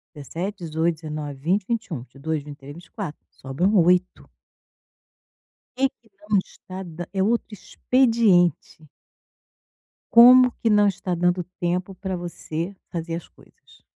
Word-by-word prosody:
17, 175 +7 -6
18, 165 +1 0
19, 150 -2 -6
20, 180 +8 -1
21, 215 - -3
22, 140 +5 -5
23, 145 -1 -10
24, 170 0 -8
sobram 140 +9 -2
8. 180 +1 +2 1.5
Quem 270 +1 +2
que 230 - -28 0.2
não 205 - +4
está, 185 0 -7
da 175 0 -7
é 195 - -2
outro 230 +4 0
expediente. 210 - +1 1.3
Como 250 +1 +8
que 230 - +1
não 205 -1 +5
está 185 -2 -2
dando 175 +1 +1 0.2
tempo 180 +2 -2
pra 190 0 -4
você 175 +1 -5
fazer 165 -1 -4
as 170 - -9
coisas? - - -23
175 Hz, 125 wpm, -23 LUFS, 160-200 Hz, 1.5 s, Como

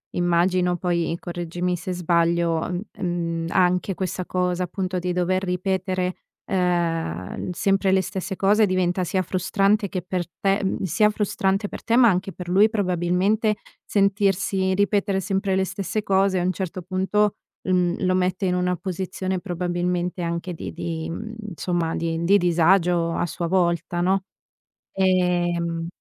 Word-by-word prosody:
immagino 175 +1 +2
poi, 170 -1 0
correggimi 175 +1 -3
se 180 +2 -4
sbaglio, 170 -1 +1
mh 180 0 -2 0.2
mhmm, 170 -2 -2
anche 180 +2 +2
questa 185 0 -3
cosa 180 0 0
appunto 185 +1 -3
di 180 0 -1
dover 185 +1 0
ripetere, 185 0 -1 0.3
ehm, 170 - -1
sempre 195 +2 +1
le 190 0 +4
stesse 190 +1 -4
cose 205 +3 +4
diventa 185 -1 +1
sia 185 +2 0
frustrante 195 +3 +1
che 185 - -3
per 180 0 -3
te 195 +1 +1
mhmm, 190 - -1
sia 195 +4 +3
frustrante 200 -1 0
per - - -8
te, 230 - +1
ma 240 -1 +7
anche 190 0 -1
per 180 -1 -8
lui 200 +4 +5
probabilmente 195 +2 +1 0.3
sentirsi 195 -1 +1
ripetere 200 0 +1
sempre 195 0 0
le 190 0 +2
stesse 195 +3 -3
cose, 195 -2 +2
a - - 0
un 180 - +2
certo 185 -1 -5
punto, 190 +3 +1 0.3
mhmm, 180 0 +1
lo 185 - +2
mette 185 +1 0
in 180 - +1
una 180 0 +1
posizione 185 +1 -3
probabilmente 175 0 -2
anche 170 +1 -3
di 165 - -6
di, 160 -1 -4
mhmm 220 +6 -6 0.2
insomma, 170 -1 -1
di 165 0 -2
di 195 +4 +5
disagio 175 -1 +3
a - - 0
sua 170 +1 -3
volta, 170 -1 +1
no. 190 +2 +2 0.7
Ehm 175 -3 +1
180 Hz, 150 wpm, -23 LUFS, 175-190 Hz, 0.7 s, ma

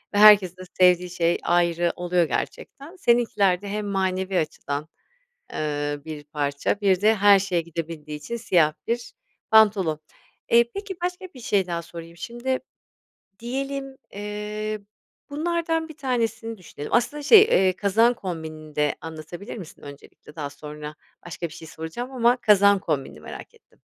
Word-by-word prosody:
ve - - +2
herkesin 205 -4 +7
de - - -10 0.2
sevdiği 180 -1 +4
şey 170 -1 +1
ayrı 175 0 +2
oluyor 180 0 +1
gerçekten. 280 - -5
Seninkiler 225 - +2
de 205 - -8
hem 210 +1 -3
manevi 190 -1 0
açıdan, 150 -1 -4 0.7
eee, 145 -1 -2
bir 155 -2 -7
parça, 145 +6 -2
bir 190 -3 +3
de 215 +2 +5
her 205 -1 +6
şeye 185 -3 0
gidebildiği 160 -2 -6
için 235 +10 -5
siyah 175 -9 +3
bir 235 +1 -2 0.4
pantolon. 200 -8 +4 0.5
Eee, 235 0 +6
peki 400 -1 -5
başka 360 +1 -3
bir 255 - -11
şey 200 -5 +1
daha 170 -1 -3
sorayım. 170 0 -10
Şimdi 240 +8 -3 0.8
diyelim, 270 +2 -4 0.2
eee, 210 +1 -4 0.5
bunlardan 325 +1 -1
1 315 - -11
tanesini 230 -4 -2
düşünelim. 155 -5 -9
Aslında 265 +5 +1
şey, 415 +8 +9
eee, 190 - +4
kazağın 220 +5 +3
kombinini 160 -7 -7
de 150 -1 +1
anlatabilir 165 +7 -8
misin 180 -7 -11
öncelikle? 145 +1 -13
Daha 145 -3 -4
sonra 150 +1 -9 0.3
başka 175 0 -5
bir 160 - -13
şey 160 - -10
soracağım 160 +11 -6
ama 245 -1 +3
kazağın 200 -1 +5
kombinini 140 - -3
merak 75 - -10
ettim. - - -27
190 Hz, 150 wpm, -24 LUFS, 160-235 Hz, 0.8 s, şey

